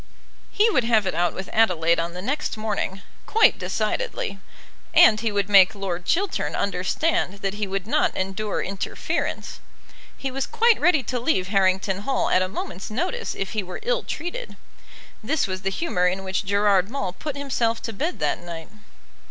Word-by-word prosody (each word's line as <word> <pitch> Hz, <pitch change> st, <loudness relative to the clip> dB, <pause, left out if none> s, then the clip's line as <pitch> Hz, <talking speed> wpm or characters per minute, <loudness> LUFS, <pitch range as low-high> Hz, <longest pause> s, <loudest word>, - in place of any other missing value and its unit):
He 425 Hz, +2 st, +3 dB
would 255 Hz, -, +2 dB
have 220 Hz, -3 st, +3 dB
it 185 Hz, -, -1 dB
out 175 Hz, +1 st, +1 dB
with 190 Hz, 0 st, -5 dB
Adelaide 170 Hz, -7 st, +3 dB
on 170 Hz, +1 st, -3 dB
the 180 Hz, -, -6 dB
next 280 Hz, +1 st, -2 dB
morning, 205 Hz, -3 st, -3 dB, 0.2 s
quite 445 Hz, 0 st, +4 dB
decidedly. 455 Hz, -, -2 dB, 0.6 s
And 215 Hz, -, +7 dB
he 225 Hz, -1 st, -1 dB
would 200 Hz, -1 st, 0 dB
make 200 Hz, 0 st, +6 dB
Lord 180 Hz, -3 st, -4 dB
Chiltern 380 Hz, -, 0 dB
understand 195 Hz, -, 0 dB
that 195 Hz, -1 st, 0 dB
he 205 Hz, 0 st, -3 dB
would 195 Hz, 0 st, -3 dB
not 225 Hz, -, +1 dB
endure 195 Hz, +3 st, -2 dB
interference. 195 Hz, +1 st, -3 dB, 0.6 s
He 270 Hz, -, -4 dB
was 270 Hz, +1 st, -2 dB
quite 460 Hz, 0 st, +3 dB
ready 315 Hz, -4 st, +4 dB
to 250 Hz, +2 st, -2 dB
leave 230 Hz, -8 st, 0 dB
Harrington 190 Hz, -1 st, +2 dB
Hall 265 Hz, +6 st, 0 dB
at 185 Hz, -, +4 dB
a 185 Hz, -, +1 dB
moment's 190 Hz, -1 st, -6 dB
notice 365 Hz, -, -2 dB
if 195 Hz, -, -3 dB
he 215 Hz, -, -1 dB
were 185 Hz, -1 st, -7 dB
ill -, -, +1 dB
treated. 355 Hz, +10 st, -6 dB, 0.7 s
This 285 Hz, +7 st, +1 dB
was 185 Hz, -2 st, -4 dB
the 195 Hz, -, -1 dB
humour 195 Hz, -, 0 dB
in 190 Hz, +2 st, -1 dB
which 190 Hz, +1 st, -2 dB
Gerard 200 Hz, -1 st, +3 dB
Maule 205 Hz, -8 st, -3 dB
put 285 Hz, +8 st, -5 dB
himself 240 Hz, -5 st, 0 dB
to 225 Hz, -, -4 dB
bed 310 Hz, -, -2 dB
that -, -, 0 dB
night. 170 Hz, -2 st, -8 dB
205 Hz, 175 wpm, -24 LUFS, 190-275 Hz, 0.7 s, And